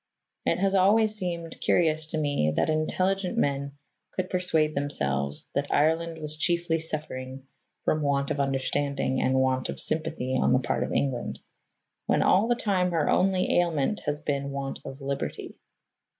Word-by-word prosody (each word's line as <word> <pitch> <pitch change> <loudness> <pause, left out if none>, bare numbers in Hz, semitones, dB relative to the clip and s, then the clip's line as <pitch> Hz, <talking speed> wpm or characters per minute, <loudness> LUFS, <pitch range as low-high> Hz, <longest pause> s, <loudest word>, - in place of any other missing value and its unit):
It - - +3
has 195 +1 +1
always 210 +3 +4
seemed 170 -5 -4
curious 155 -2 +2
to 160 - -3
me 145 - +1
that 155 - +2
intelligent 185 +6 0
men 140 -6 0 0.4
could 185 -1 -3
persuade 160 -4 +1
themselves 70 - -2
that 140 0 -1
Ireland 165 +2 +2
was 155 -1 -4
chiefly 170 0 +1
suffering 135 -4 -4 0.4
from 155 - +2
want 140 0 0
of 145 - -2
understanding 135 0 0
and 130 - +2
want 130 -1 +1
of - - -5
sympathy 155 -5 -2
on - - +3
the 130 - +4
part 130 0 -1
of - - -4
England, 130 -4 -1 0.7
when - - +3
all 200 +5 +4
the 240 - +3
time 190 -6 +1
her 165 -4 +1
only 185 -1 +3
ailment 170 +2 +1
has 150 0 0
been 140 -2 -2
want 140 -1 -4
of 135 +1 -8
liberty. 135 - -4
155 Hz, 160 wpm, -27 LUFS, 135-175 Hz, 0.7 s, always